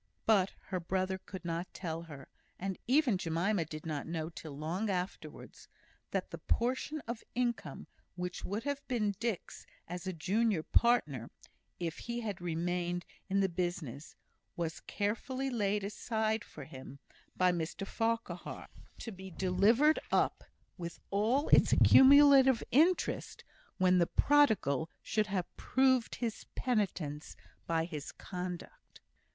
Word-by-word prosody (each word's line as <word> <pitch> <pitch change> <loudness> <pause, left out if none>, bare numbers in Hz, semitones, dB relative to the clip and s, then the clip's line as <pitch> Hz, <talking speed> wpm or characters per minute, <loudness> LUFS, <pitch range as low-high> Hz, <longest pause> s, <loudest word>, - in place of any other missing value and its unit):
But 200 -4 +3 0.2
her 185 - -1
brother 185 +2 -1
could 185 -1 -9
not 170 +2 -3
tell 165 -3 -4
her 145 -5 -10 0.3
and 190 0 -4
even 255 -6 +3
Jemima 170 +2 0
did 155 0 -8
not 150 -3 -3
know, 160 0 -3
till 155 -3 -9
long 175 +8 -2
afterwards 180 -1 -5 0.4
that - - -2
the - - -6
portion 260 +5 -1
of 235 -2 -6
income 240 -1 -2 0.3
which 180 0 -4
would 205 +4 -3
have 285 0 -2
been 215 -5 0
Dick's 230 -6 -3 0.2
as 180 +1 -6
a - - 0
junior 195 +2 +1
partner, 155 - +2 0.5
if 165 -2 -3
he 240 0 -4
had 205 -6 -4
remained 175 +1 -2 0.2
in 195 +1 +2
the 195 - +3
business, 170 -6 -4 0.4
was 165 -1 -3
carefully 255 +6 -2
laid 205 -3 0
aside 220 +1 -1
for - - -10
him 130 0 -10 0.4
by 185 0 +4
Mr 170 +3 -3
Farquhar; 225 -5 -3 0.3
to 230 - -6
be 190 -1 -9
delivered 200 - +3
up, - - +2 0.4
with 170 -1 -6
all 225 +9 +2
its - - +6
accumulated 270 -2 +7
interest, 335 +7 +2 0.3
when 185 -1 +4
the 170 - +3
prodigal 215 - +3
should 215 -1 0
have 190 -3 -3
proved 260 -2 +2
his 230 -3 -4
penitence 185 - -1 0.3
by 165 -1 +1
his 155 -4 -6
conduct. 180 - -7
190 Hz, 135 wpm, -33 LUFS, 170-230 Hz, 0.5 s, accumulated